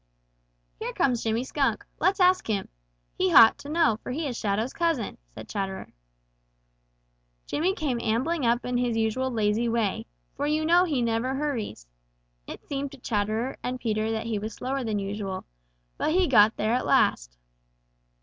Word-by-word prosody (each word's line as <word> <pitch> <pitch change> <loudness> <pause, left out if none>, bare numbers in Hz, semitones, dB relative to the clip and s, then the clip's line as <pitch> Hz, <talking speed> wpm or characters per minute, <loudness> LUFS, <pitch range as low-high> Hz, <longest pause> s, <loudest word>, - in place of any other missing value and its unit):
"Here - - -4
comes 250 -4 +1
Jimmy 225 +2 0
Skunk. 260 -5 -1
Let's 375 +4 +2
ask 365 0 +4
him. 205 -3 -2 0.4
He 185 - 0
ought 225 +4 +8
to 285 - -9
know, 310 -9 +2
for - - -6
he 310 +5 -2
is 260 -4 -3
Shadow's 220 +3 -1
cousin," 330 -9 -1 0.2
said - - -9
Chatterer. 195 -2 -5 1.5
Jimmy 365 +6 0
came 260 -9 -2
ambling 265 +8 0
up 235 0 +1
in 250 0 -1
his 240 -2 0
usual 225 +4 0
lazy 225 0 +1
way, 225 -4 -1 0.3
for 290 - -2
you 310 +1 0
know 350 +3 +5
he 285 -8 0
never 235 +3 0
hurries. 265 - -3 0.6
It - - -8
seemed 280 -1 -3
to - - -10
Chatterer 220 +1 -2
and 250 0 -3
Peter 215 -2 -1
that 225 0 -2
he 225 -2 -2
was 215 +1 -6
slower 265 +1 -3
than 220 -3 -1
usual. 195 -1 -4 0.5
But 310 - +1
he 370 +1 +4
got 220 -4 +5
there 215 +2 0
at 250 - 0
last. - - +2
235 Hz, 170 wpm, -26 LUFS, 215-280 Hz, 1.5 s, ought